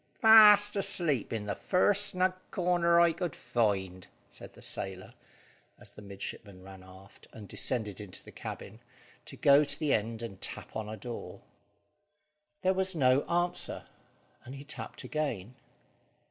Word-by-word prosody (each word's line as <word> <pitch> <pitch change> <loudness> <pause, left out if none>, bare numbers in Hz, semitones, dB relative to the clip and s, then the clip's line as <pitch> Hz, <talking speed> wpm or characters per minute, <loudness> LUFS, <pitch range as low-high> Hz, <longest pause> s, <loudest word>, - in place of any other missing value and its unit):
"Fast 210 -2 +7
asleep 175 - -1
in 110 -2 -3
the 100 - -2
first 200 - +2
snug 185 -1 0 0.2
corner 175 -1 +2
I 170 -1 +5
could 170 -2 -4
find," 95 -5 -2 0.2
said - - -12
the - - -15
sailor, 95 -1 -6 0.6
as - - -12
the - - -13
midshipman 100 -1 -8
ran 95 0 -12
aft, 95 +1 -16
and 105 -3 -11
descended 105 -4 -1
into 100 -3 -9
the - - -13
cabin, 110 - -8 0.5
to - - -10
go 145 -2 +5
to 145 - 0
the 155 -3 +1
end 115 +2 -2
and 100 -5 -8
tap - - -6
on 110 -1 -4
a 110 - -6
door. 120 0 -8 1.2
There 190 0 +3
was 190 -1 -1
no 130 -2 +3
answer, 175 +1 0 0.6
and 130 - -9
he 140 - -9
tapped 145 - -8
again. 125 -9 -3
130 Hz, 150 wpm, -30 LUFS, -, 1.2 s, Fast